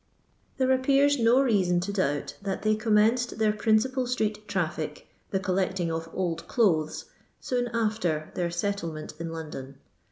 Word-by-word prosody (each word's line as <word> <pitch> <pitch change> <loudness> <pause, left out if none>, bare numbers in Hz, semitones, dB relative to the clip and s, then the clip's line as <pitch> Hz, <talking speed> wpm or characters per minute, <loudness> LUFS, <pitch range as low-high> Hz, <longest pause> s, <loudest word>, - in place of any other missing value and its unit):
There 260 -1 +2
appears 275 +2 +3
no 235 +3 +5
reason 190 -8 +2
to 200 +3 -3
doubt 145 -7 -1
that 195 -1 -3
they 215 0 +3
com 215 0 0
menced 230 +4 +3
their 215 -1 +2
principal 235 +4 +1
street 215 -4 -2
traflk, 160 -5 -2 0.3
the 190 - 0
collecting 185 -2 0
of 165 0 -4
old 170 -3 -3
clothes, 165 -10 +1 0.3
soon 245 -1 -1
niter 210 -9 -1
their 175 -1 -1
settlement 170 -3 -3
in 165 0 -4
Loudon. 150 -4 -7
200 Hz, 150 wpm, -27 LUFS, 170-230 Hz, 0.3 s, no